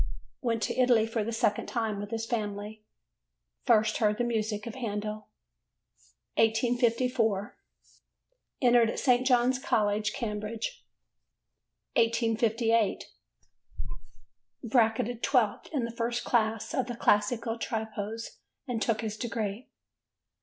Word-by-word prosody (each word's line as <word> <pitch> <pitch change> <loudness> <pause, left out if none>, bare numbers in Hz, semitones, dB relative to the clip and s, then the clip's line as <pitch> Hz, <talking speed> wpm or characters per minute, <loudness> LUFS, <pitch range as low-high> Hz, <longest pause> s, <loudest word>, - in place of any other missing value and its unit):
Went 230 -4 0
to - - -1
Italy 245 -3 +4
for 225 -1 -2
the 230 - -3
second 215 -2 0
time 220 -4 -2
with 205 0 -5
his 225 0 -3
family. 210 -2 -4 0.8
First 220 -3 +4
heard 210 -1 +2
the 240 - 0
music 220 -3 -1
of 230 - -5
Handel. 215 -3 -4 1.1
1854. 230 -1 +2 1.1
Entered 240 -2 +5
at - - -4
St. 255 -1 +3
John's 250 0 +3
College, 210 -3 +1
Cambridge. 220 - -4 1.1
1858. 230 -1 +1 1.5
Bracketed 230 0 +1
12th 250 -6 +1
in 275 -6 0
the 235 - -5
first 235 +1 -1
class 220 0 0
of 260 -5 0
the 240 - -4
Classical 225 +2 +1
Tripos 220 0 -4 0.3
and 240 -3 -2
took 230 -1 +1
his 215 -2 -3
degree. 225 -1 -4
225 Hz, 110 wpm, -29 LUFS, 215-240 Hz, 1.5 s, Entered